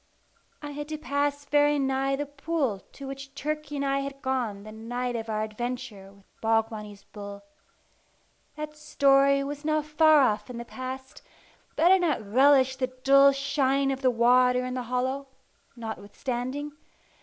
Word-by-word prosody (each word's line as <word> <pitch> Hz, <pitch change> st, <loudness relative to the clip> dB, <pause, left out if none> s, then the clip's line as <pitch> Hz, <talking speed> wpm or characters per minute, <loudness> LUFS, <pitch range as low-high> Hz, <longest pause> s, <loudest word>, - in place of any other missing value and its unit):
I 295 Hz, -, -5 dB
had 295 Hz, +1 st, -6 dB
to 310 Hz, -, -3 dB
pass 285 Hz, -1 st, -1 dB
very 290 Hz, 0 st, +3 dB
nigh 270 Hz, 0 st, 0 dB
the 290 Hz, +1 st, -3 dB
pool 285 Hz, -6 st, -2 dB
to 275 Hz, -, -9 dB
which 275 Hz, 0 st, -8 dB
Turkey 305 Hz, 0 st, -4 dB
and 280 Hz, 0 st, -1 dB
I 275 Hz, 0 st, +1 dB
had 275 Hz, 0 st, -6 dB
gone 245 Hz, -7 st, -2 dB
the 215 Hz, -, -10 dB
night 245 Hz, +3 st, -4 dB
of 225 Hz, -1 st, -4 dB
our 215 Hz, 0 st, -1 dB
adventure 220 Hz, -2 st, -5 dB
with 200 Hz, 0 st, -22 dB, 0.2 s
Bogbonny's 220 Hz, -2 st, -1 dB
bull. 200 Hz, -1 st, -9 dB, 1.1 s
That 300 Hz, 0 st, -6 dB
story 275 Hz, -2 st, +3 dB
was 290 Hz, +1 st, -6 dB
now 310 Hz, 0 st, +1 dB
far 305 Hz, 0 st, +5 dB
off 220 Hz, -2 st, +1 dB
in 245 Hz, -, -7 dB
the 235 Hz, -, -6 dB
past, 260 Hz, +1 st, -7 dB, 0.5 s
but 320 Hz, -, +2 dB
I -, -, +7 dB
did 380 Hz, 0 st, +6 dB
not 300 Hz, -, 0 dB
relish 265 Hz, +3 st, +4 dB
the 260 Hz, -1 st, 0 dB
dull 275 Hz, +2 st, +5 dB
shine 275 Hz, 0 st, +1 dB
of 265 Hz, 0 st, -4 dB
the 260 Hz, -, +4 dB
water 250 Hz, +1 st, +4 dB
in 255 Hz, -, -4 dB
the 255 Hz, -, -2 dB
hollow, 260 Hz, +2 st, -1 dB, 0.5 s
notwithstanding. 245 Hz, +5 st, -5 dB
265 Hz, 165 wpm, -27 LUFS, 240-285 Hz, 1.1 s, I